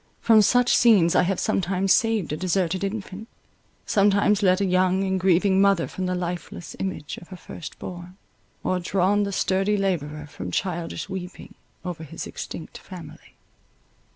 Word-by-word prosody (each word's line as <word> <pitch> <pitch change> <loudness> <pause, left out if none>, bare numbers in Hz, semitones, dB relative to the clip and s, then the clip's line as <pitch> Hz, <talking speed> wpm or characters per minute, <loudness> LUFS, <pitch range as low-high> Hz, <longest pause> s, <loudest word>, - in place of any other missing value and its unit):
From 225 -2 +5
such 245 +4 +4
scenes 200 -8 +5
I - - +5
have 180 +1 0
sometimes 190 +1 +1
saved 225 -9 +1
a - - 0
deserted 185 +2 -1
infant—sometimes 205 0 -1
led 185 -1 +4
a 200 - +1
young 185 +1 +2
and 190 -1 0
grieving 190 +1 +3
mother 195 -4 +3
from 185 -1 -4
the 180 - -1
lifeless 175 -1 -5
image 190 -6 -4
of 175 - -15
her 185 - -10
first 170 -3 -9
born, 180 +1 -9 0.5
or 185 - 0
drawn 190 +3 +1
the 200 - -3
sturdy 195 +2 +1
labourer 155 -6 -2
from 95 -11 -7
childish 175 - -3
weeping 185 -2 -7 0.3
over 175 -3 -5
his 155 - -7
extinct - - -8
family. - - -12
185 Hz, 155 wpm, -24 LUFS, 175-200 Hz, 0.5 s, From